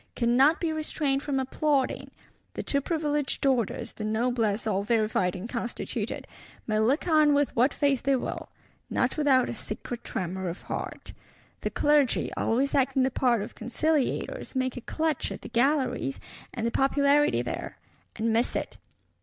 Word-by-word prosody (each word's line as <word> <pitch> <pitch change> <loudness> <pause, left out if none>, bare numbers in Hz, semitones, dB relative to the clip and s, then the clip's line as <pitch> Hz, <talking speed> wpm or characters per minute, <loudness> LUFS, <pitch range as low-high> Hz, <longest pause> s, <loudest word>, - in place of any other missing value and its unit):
"cannot 260 +6 +4
be 330 -2 -1
restrained 300 -3 -1
from 280 -2 -1
applauding." 270 +1 0 0.5
The - - -3
two 280 - +1
Privileged 295 -3 -1
Orders, 250 -7 0
the 215 - -7
Noblesse 220 -1 0
all 200 -3 +1
verified 215 -4 +1
and 185 +4 -5
constituted, 235 0 -4 0.4
may 215 -1 0
look 260 +11 +2
on 305 -3 +5
with 285 -1 +1
what 250 +4 +4
face 280 -3 +1
they 275 0 +2
will; 255 - -4 0.4
not - - +1
without 275 -4 +3
a - - -3
secret 235 +2 -6
tremor 185 0 -3
of 170 - -7
heart. - - -6 0.5
The - - -1
Clergy, 295 -4 +2
always 265 +5 +1
acting 270 -1 +3
the 265 - +1
part 240 -5 +2
of - - -8
conciliators, 300 - -1
make 260 -1 0
a 250 - -6
clutch 315 +3 -1
at - - -7
the - - -7
Galleries, 255 - +1 0.3
and 230 -3 -3
the 235 - +1
popularity 280 +3 +3
there; - - -5 0.4
and 225 0 0
miss 230 +2 +1
it. - - -3
260 Hz, 160 wpm, -27 LUFS, 230-290 Hz, 0.5 s, on